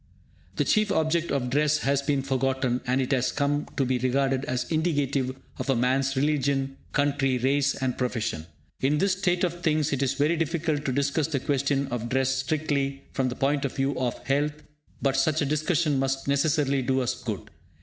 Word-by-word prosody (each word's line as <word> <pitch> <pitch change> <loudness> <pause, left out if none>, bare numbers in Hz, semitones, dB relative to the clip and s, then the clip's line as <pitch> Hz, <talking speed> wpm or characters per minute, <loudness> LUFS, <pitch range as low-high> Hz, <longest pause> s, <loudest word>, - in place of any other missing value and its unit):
The - - +1
chief 215 -2 +2
object 160 +1 +1
of 125 -3 -1
dress 150 +2 +3
has 140 0 +2
been 140 -1 0
forgotten, 130 -2 0
and 130 +1 +2
it 130 +1 -1
has 130 -2 +2
come 145 +1 0
to 135 - +2
be 125 0 0
regarded 135 +1 +1
as 125 0 -1
indicative 145 -5 0 0.2
of - - -4
a 135 - +4
man's 130 +3 +1
religion, 135 -1 0 0.2
country, 145 -2 +1
race 135 +3 +2
and 130 -2 -1
profession. 115 -10 -2 0.3
In 140 +3 +2
this 195 +4 +2
state 180 -1 0
of 175 -1 -1
things, 155 -3 +1
it 135 - -1
is 135 - +1
very 155 +4 +2
difficult 155 -1 -1
to 130 - 0
discuss 140 +3 +1
the 150 -4 -1
question 140 +1 0
of 120 -1 -3
dress 135 +1 +1
strictly 140 0 -1
from 130 -2 0
the 125 - -5
point 140 +1 +1
of 135 - -3
view 135 0 0
of 125 -2 -1
health, 145 +2 +1 0.5
but 135 -1 +2
such 155 +3 +2
a 145 - +1
discussion 150 0 +1
must 135 0 -1
necessarily 140 -1 +2
do 130 +1 +1
us 125 - 0
good. - - -6
140 Hz, 190 wpm, -26 LUFS, 130-150 Hz, 0.5 s, a